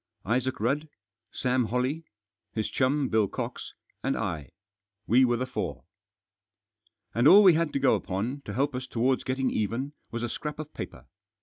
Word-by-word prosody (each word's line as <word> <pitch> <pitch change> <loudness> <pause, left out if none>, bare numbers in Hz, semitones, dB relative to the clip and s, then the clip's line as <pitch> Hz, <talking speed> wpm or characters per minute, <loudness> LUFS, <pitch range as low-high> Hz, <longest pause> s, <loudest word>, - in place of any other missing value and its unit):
Isaac 125 +4 0
Rudd, 140 +8 0 0.4
Sam 125 -1 +1
Holley, 130 +8 -1 0.5
his 110 -1 -2
chum, 135 +2 +2
Bill 110 -3 +2
Cox, - - -5 0.3
and - - 0
I; 75 -4 -3 0.6
we 125 +3 +5
were 120 -1 +2
the 130 - -1
four. 130 - -4 1.3
And 120 +5 +4
all 200 +6 +9
we 185 -3 +8
had 165 -1 +1
to - - +1
go 135 -1 +4
upon, 115 +9 -2
to 105 - -5
help 140 +3 +1
us 125 +1 -4
towards 125 +3 +1
getting 130 0 0
even, 115 +7 -2 0.2
was 115 0 -4
a - - 0
scrap 150 +5 -5
of 155 0 -7
paper. - - -7
130 Hz, 170 wpm, -28 LUFS, 115-140 Hz, 1.3 s, all